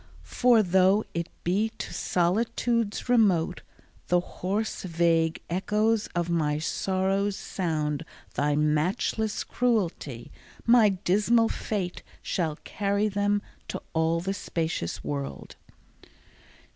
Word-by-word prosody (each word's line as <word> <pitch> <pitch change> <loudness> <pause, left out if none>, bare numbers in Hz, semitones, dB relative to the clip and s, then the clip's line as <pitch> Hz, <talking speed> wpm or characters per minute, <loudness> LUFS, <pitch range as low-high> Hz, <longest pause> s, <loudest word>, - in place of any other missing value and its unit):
For, 240 -3 +4
though 190 +3 +4
it 170 -1 -3
be 200 +6 +1
to - - -6
solitudes 220 +5 0
remote 195 -8 +3 0.5
The 180 - +4
hoarse 200 +5 -3
vague 165 -2 +1
echoes 210 +5 +1
of 175 -1 0
my 155 -4 +1
sorrows 190 +4 0
sound 155 -7 -2 0.3
Thy 145 0 +1
matchless 165 +8 0
cruelty, 175 - -1 0.3
my 230 -2 +6
dismal 210 +5 +2
fate 190 -5 -3 0.2
Shall 160 -4 -1
carry 200 +1 0
them 205 0 +1 0.2
to - - -4
all 160 +1 +2
the 195 +2 -2
spacious 165 - -3
world. 140 -1 -5
185 Hz, 105 wpm, -27 LUFS, 165-210 Hz, 0.5 s, my